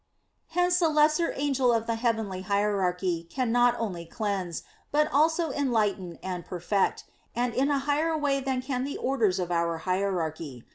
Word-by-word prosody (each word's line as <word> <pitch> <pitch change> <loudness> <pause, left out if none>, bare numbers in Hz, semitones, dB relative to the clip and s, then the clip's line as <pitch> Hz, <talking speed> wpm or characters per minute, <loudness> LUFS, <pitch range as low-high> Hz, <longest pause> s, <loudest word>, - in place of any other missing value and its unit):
Hence 355 0 +3
the 335 -3 +3
lesser 305 +2 +3
angel 270 -3 +2
of 230 -1 +1
the 230 - 0
heavenly 225 -5 -1
hierarchy 185 -3 0
can 255 0 -1
not 245 0 +4
only 185 -7 -3
cleanse, 190 -2 -3 0.3
but 300 +1 +3
also 320 +2 +3
enlighten 210 - 0
and 180 -2 -4
perfect, 185 +3 -1 0.3
and 245 0 0
in 270 +4 +1
a 285 - +2
higher 310 +3 +1
way 285 -2 +1
than 260 -1 -2
can 255 -1 -2
the 280 +1 -4
orders 230 -8 +1
of 180 -2 -2
our 170 -1 0
hierarchy. 165 -8 -2
225 Hz, 160 wpm, -27 LUFS, 185-275 Hz, 0.3 s, not